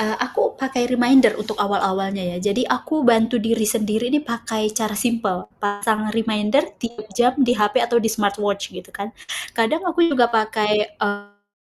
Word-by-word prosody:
Eee, 220 0 -1
aku 485 +1 -1
pakai 260 -2 -1
reminder 250 +1 +5
untuk 215 0 -5
awal-awalnya 195 -1 0
ya. - - -4
Jadi, 210 +6 0
aku 310 +3 -1
bantu 230 0 +4
diri 225 -1 +1
sendiri 220 +1 0
nih 295 +2 +1
pakai 225 -4 -2
cara 215 -2 -2
simpel 215 -5 -1 0.2
pasang 215 +1 -1
reminder 220 +4 +1 0.2
3 235 -3 -6
jam 245 +5 +2
di 260 -4 +3
HP 215 +1 +2
atau 235 0 +2
di 225 - 0
smartwatch 205 -2 -1
gitu, - - -10
kan. 200 +1 -7 0.4
Kadang 235 +10 0
aku 345 -1 +2
juga 245 -6 +2
pakai, 215 -1 +1
eee, 205 0 -5
220 Hz, 165 wpm, -21 LUFS, 210-245 Hz, 0.4 s, reminder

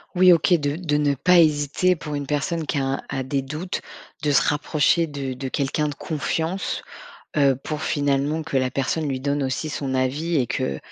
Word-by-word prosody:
Oui 180 0 +7
OK, 170 +1 +4
de 145 -3 +1
de 165 -5 -1
ne 145 -1 +2
pas 180 +6 +5
hésiter, 155 +3 +3
pour 150 -1 -5
une 140 -1 -4
personne 155 +3 -1
qui 145 - -2
a - - 0
un 135 +1 -1
a 135 -1 -2
des 135 +1 -1
doutes, 155 +7 -4 0.4
de 150 - +2
se 140 - +5
rapprocher 150 +3 +2
de 140 -4 -4
de 130 +1 -5
quelqu'un 145 +3 0
de 145 - -6
confiance, 160 +5 -2 0.6
heu, 140 -2 +4
pour 150 +3 -5
finalement, 145 +2 0
que 155 -3 -3
la 130 -1 0
personne 140 +4 -1
lui 135 -2 -2
donne 140 +1 0
aussi 135 +3 -2
son 135 -2 -3
avis 145 +6 0
et 130 -4 +2
que, 70 - -2
145 Hz, 205 wpm, -23 LUFS, 135-160 Hz, 0.6 s, Oui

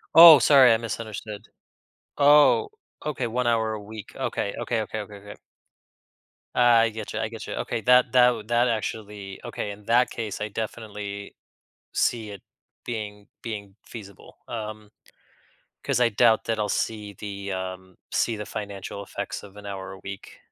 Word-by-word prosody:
Oh, 165 -3 +12
sorry, 130 -2 +7
I - - +3
misunderstood, 110 -2 -6 0.7
oh, 150 - +6 0.4
okay, 135 -5 -2
1 125 +2 -1
hour 110 -2 +1
a 105 - -5
week, 110 0 -10
okay, 100 - -2
okay, 120 - -1
okay, 110 +1 -5
okay, 105 0 -10
okay. 100 +1 -11 1.2
I 115 -2 +5
get 110 -1 -7
you - - -2
I 110 - -1
get 115 -1 -8
you, - - -4
okay, 115 - -3
that 125 +2 +5
that 125 -4 +4
that 120 +1 +3
actually 105 -3 -4
okay, 105 - -4
in 100 0 -11
that 120 +3 +3
case, 110 -4 -5
I 105 - -1
definitely 105 -2 -6 0.6
see 110 -3 0
it 100 -2 -10 0.4
being 105 -3 -6
being 100 -3 -6
feasible, 100 -5 -12
um, 110 -2 -6 0.9
'cause - - 0
I 120 - +5
doubt 110 +1 +4
that 115 -1 -1
I'll 105 -1 0
see 105 -2 -2
the, 100 0 -6
um 95 -1 -6 0.2
see 115 - +1
the 105 0 -6
financial 100 -1 -6
effects 100 - -6
of 100 0 -14
an 105 - -10
hour 95 -1 -6
a 95 - -10
week. 95 0 -9
110 Hz, 160 wpm, -25 LUFS, 100-115 Hz, 1.2 s, Oh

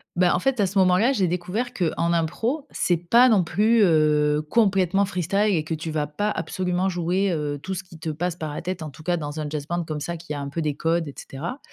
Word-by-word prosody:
Ben, 175 0 +3
en - - +2
fait, 260 +3 0
à 200 - +3
ce 195 +2 -3
moment-là, 190 +7 +4
j'ai 195 -8 +1
découvert 180 +9 -2
qu'en 170 -3 0
impro, 225 - -1
c'est 175 -2 +1
pas 235 +10 +5
non 205 -6 +4
plus, 215 +7 +3
heu, 150 -3 +3
complètement 195 -2 +2
freestyle 195 +2 0
et 155 - 0
que 160 +1 -4
tu 160 +1 -4
vas 155 -1 -1
pas 180 +9 -2
absolument 185 -2 -1
jouer, 180 +2 0
heu, 150 -3 -2
tout 190 - -4
ce 190 - -4
qui 175 -3 -14
te 160 0 -5
passe 175 +3 -2
par 155 -4 -5
la - - -5
tête; 180 -1 -4
en 155 - -6
tout 155 - -14
cas 175 +2 0
dans 150 -1 -5
un 150 -1 -3
jazz 150 -2 -4
band 175 0 -1
comme 155 -1 -4
ça 170 +4 -3
qui 160 -2 -6
a - - -4
un 140 0 -4
peu 165 +3 -3
des 150 -2 -1
codes, 165 +2 0
et 140 - -8
cetera, 170 - -6
175 Hz, 255 wpm, -24 LUFS, 155-195 Hz, -, pas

